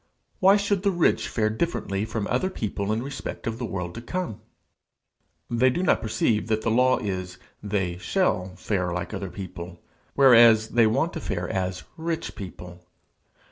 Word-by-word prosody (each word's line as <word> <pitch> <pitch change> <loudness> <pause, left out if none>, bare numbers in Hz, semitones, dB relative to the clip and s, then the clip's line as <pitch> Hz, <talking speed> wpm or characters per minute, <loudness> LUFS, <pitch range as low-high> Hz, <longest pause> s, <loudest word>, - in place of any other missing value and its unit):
Why 195 +2 +6
should 200 -1 0
the 200 - +2
rich 175 -3 +2
fare 110 -2 0
differently 110 - -2
from 110 -1 -3
other 130 - 0
people 105 - -3
in 110 +2 -1
respect 135 0 -6
of 115 0 -3
the 120 - -3
world 90 -3 -4
to 115 - -7
come? 120 - -4 1.1
They 120 +2 +3
do 155 +9 -1
not - - +3
perceive 110 0 0
that 110 -1 0
the 115 - +1
law 130 +2 +4
is 95 -3 -4 0.2
they 95 -4 -2
shall 95 - 0
fare 90 -1 -1
like 90 +4 -4
other 95 -1 -4
people, 90 -2 -8 0.4
whereas 115 -5 +7
they 115 -2 +4
want 160 +10 +1
to 160 - -5
fare 90 -8 -3
as 90 -1 -2
rich 165 0 -3
people. 90 -3 -9
110 Hz, 170 wpm, -25 LUFS, 95-130 Hz, 1.1 s, whereas